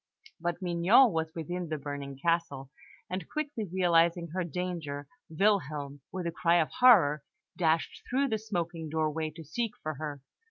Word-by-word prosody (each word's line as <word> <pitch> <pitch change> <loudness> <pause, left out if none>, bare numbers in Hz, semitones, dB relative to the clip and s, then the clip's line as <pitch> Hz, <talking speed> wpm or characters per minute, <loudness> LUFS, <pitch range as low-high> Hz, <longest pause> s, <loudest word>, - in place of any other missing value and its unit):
But 175 +2 -3
Mignon 180 +8 +5
was 160 -1 -1
within 175 +1 -4
the 155 - -2
burning 140 -1 -6
castle; 145 -4 -1 0.4
and 185 -2 -5
quickly 285 - -3
realising 170 -2 +3
her 185 +3 -2
danger, 165 -4 -4 0.2
Wilhelm, 155 -6 0
with 185 -2 -4
a 170 - -1
cry 170 0 +2
of 160 - +1
horror, 180 - +6 0.3
dashed 165 -2 0
through 275 +2 +1
the 220 -2 0
smoking 175 -6 -3
doorway 155 0 -1
to 160 +2 -11
seek 225 - -3
for 155 - -2
her. 145 -2 -6
170 Hz, 155 wpm, -30 LUFS, 155-185 Hz, 0.4 s, horror